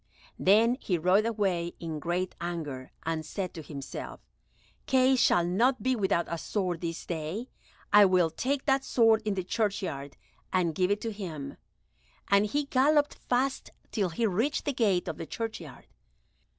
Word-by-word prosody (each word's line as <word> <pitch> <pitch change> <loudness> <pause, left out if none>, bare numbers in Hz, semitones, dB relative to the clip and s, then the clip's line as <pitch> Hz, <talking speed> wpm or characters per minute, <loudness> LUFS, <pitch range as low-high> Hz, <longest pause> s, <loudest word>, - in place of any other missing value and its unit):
Then 225 +6 +4
he 180 -9 -1
rode 185 +6 +3
away 190 -6 -1
in 160 -2 -5
great 175 +3 -2
anger, 155 -7 -5
and 160 -1 -1
said 185 +4 -4
to 165 - -7
himself, 140 -3 -7 0.7
"Kay 265 0 +4
shall 200 -8 +3
not 235 +9 +2
be 260 0 +2
without 190 -5 +1
a 170 - -4
sword 180 -4 -2
this 165 -1 -4
day. 170 +9 -4 0.4
I 205 0 +9
will 180 -3 +3
take 270 - -2
that 270 -1 +2
sword 225 -4 +4
in 210 -2 0
the 185 - -2
churchyard, 185 -9 -2 0.3
and 175 -3 +1
give 180 +3 +1
it 205 +1 0
to 225 - -3
him;" 165 -9 -6 0.7
and 200 +1 +4
he 290 +7 -1
galloped 290 +2 +3 0.2
fast 260 +2 0 0.2
till 200 -5 0
he 225 +8 -1
reached 225 +9 0
the 285 - 0
gate 205 -8 +1
of - - -4
the 165 - -6
churchyard. 225 -1 -6
195 Hz, 165 wpm, -29 LUFS, 170-230 Hz, 0.7 s, I